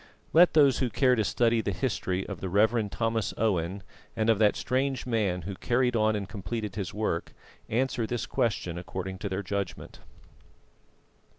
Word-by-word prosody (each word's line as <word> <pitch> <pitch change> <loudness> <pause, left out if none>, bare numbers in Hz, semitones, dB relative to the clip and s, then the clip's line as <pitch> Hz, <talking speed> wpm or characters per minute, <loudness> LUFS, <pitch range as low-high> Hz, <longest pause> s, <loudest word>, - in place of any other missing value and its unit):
Let 175 +2 +7
those 140 -4 +5
who 130 - +1
care 125 +4 +3
to 110 -3 +2
study 115 +2 +2
the - - -2
history 95 -7 -2
of 100 -5 -7
the 95 - -3
Rev. 110 +3 +2
Thomas 115 -1 -1
Owen, 95 -3 0 0.3
and 110 0 +3
of 110 - +1
that 105 -2 +4
strange 130 +1 -1
man 105 -8 0
who 100 +4 -5
carried 125 +5 +1
on 110 -1 +2
and 100 -2 -3
completed 105 0 -5
his 100 -4 -3
work, 105 -6 -2 0.4
answer 120 -1 0
this 120 0 -2
question 90 -6 -1
according 95 +2 -6
to 100 - -3
their 95 +2 -3
judgment. 100 0 -4
110 Hz, 170 wpm, -28 LUFS, 95-120 Hz, 0.4 s, Let